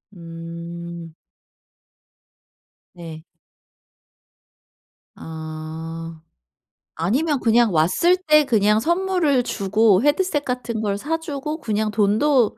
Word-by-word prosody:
음. 170 0 -8 1.8
네. 165 -3 -10 1.9
어. 160 +1 -7 0.8
아니면 265 - 0
그냥 230 -3 +3
왔을 185 - +3
때 305 -4 +4
그냥 210 -3 +3
선물을 340 -4 +1
주고 205 -1 +2
헤드셋 295 0 +1
같은 240 -4 -3
걸 200 -2 -1
사주고 305 - -4
그냥 215 -2 -1
돈도 220 +5 +2
215 Hz, 150 characters per minute, -21 LUFS, -, 1.9 s, 때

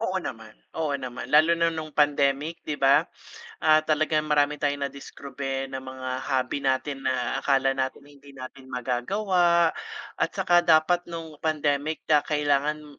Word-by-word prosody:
Oo - - -2
naman, - - -8 0.2
oo 155 -3 -1
naman 130 -2 -5
lalo 160 +3 +4
na 165 -1 +1
nung 155 -1 -5
pandemic 145 +1 +1
di 150 -1 -4
ba? 135 0 +5 0.6
Ah, 155 0 +6
talagang 155 0 0
marami 150 0 +2
tayong 145 -1 -1
nadiskubre 135 -1 -6
ng 130 - -4
mga 130 0 -7 0.2
hobby 130 -1 -1
natin 135 0 -2
na 130 0 -1
akala 135 -1 +2
natin 130 0 -2
hindi 140 -1 -17
natin 130 0 -10
magagawa 170 - +1 0.5
at - - +1
saka 175 0 +3
dapat 170 +2 +3
nung 165 -3 -8
pandemic 150 0 -1
ka 150 -1 +4
kailangan, 150 0 -1
145 Hz, 150 wpm, -25 LUFS, 135-155 Hz, 0.6 s, Ah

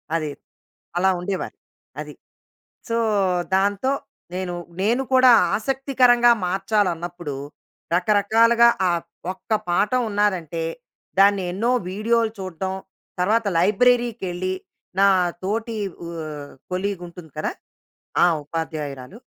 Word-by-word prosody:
అది 155 -2 -1 0.7
అలా 190 +2 +3
ఉండేవారు. 185 +2 -4 0.4
అది. - - -6 0.8
సో, 230 - +1 0.6
దాంతో 200 +6 +1 0.4
నేను 180 -1 -3 0.3
నేను 235 +6 +2
కూడా 255 0 +7 0.3
ఆసక్తికరంగా 250 0 +3
మార్చాలన్నప్పుడు 180 -4 -1 0.6
రకరకాలుగా 220 +5 +4 0.2
ఆహ్, 170 -1 0 0.3
ఒక్క 190 - -22 0.2
పాఠం 210 +8 +2
ఉన్నాదంటే, 185 -6 0 0.6
దాన్ని 200 -1 +5
ఎన్నో 220 +7 0 0.2
వీడియోలు 225 +3 +1
చూడ్టం. 190 0 -4 0.5
తర్వాత 215 +5 +2
లైబ్రరీకెళ్ళి 200 -3 +2 0.5
నా 200 - +6 0.4
తోటి 225 +3 -2 0.5
ఆహ్, 145 -2 -8 0.2
కొలీగ్ 185 0 -2
ఉంటుంది 170 -2 -12
కదా! - - -1 0.7
ఆ! - - +8 0.2
ఉపాధ్యాయురాలు 150 - -5
195 Hz, 95 wpm, -23 LUFS, 175-230 Hz, 0.8 s, ఆ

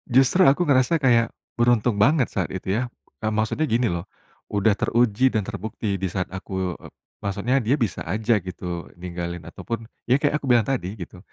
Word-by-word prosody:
Justru 135 +8 +5
aku 140 +6 +4
ngerasa 135 +3 +4
kayak 120 -4 +4 0.3
beruntung 120 -2 +3
banget 135 +3 +4
saat 95 - -1
itu 95 0 -3
ya. 125 - 0 0.4
Eee, 110 - +1
maksudnya 110 +8 0
gini 120 -1 +2
loh, 85 +2 -3 0.5
udah 105 +1 +3
teruji 120 +1 +3
dan 110 - +1
terbukti 105 -1 -3
di 95 - +1
saat 90 +1 -3
aku 95 -1 -3
e - - -7 0.3
maksudnya 100 +6 0
dia 125 -1 +1
bisa 110 -7 -1
aja 110 +6 +1
gitu 90 -2 -6
ninggalin 85 -1 -5
ataupun 115 +7 -6 0.2
ya 130 +4 +3
kayak 145 0 +2
aku 145 - -8
bilang 120 -4 +4
tadi, 100 -8 -1
gitu. 90 +1 -8
110 Hz, 180 wpm, -24 LUFS, 95-125 Hz, 0.5 s, Justru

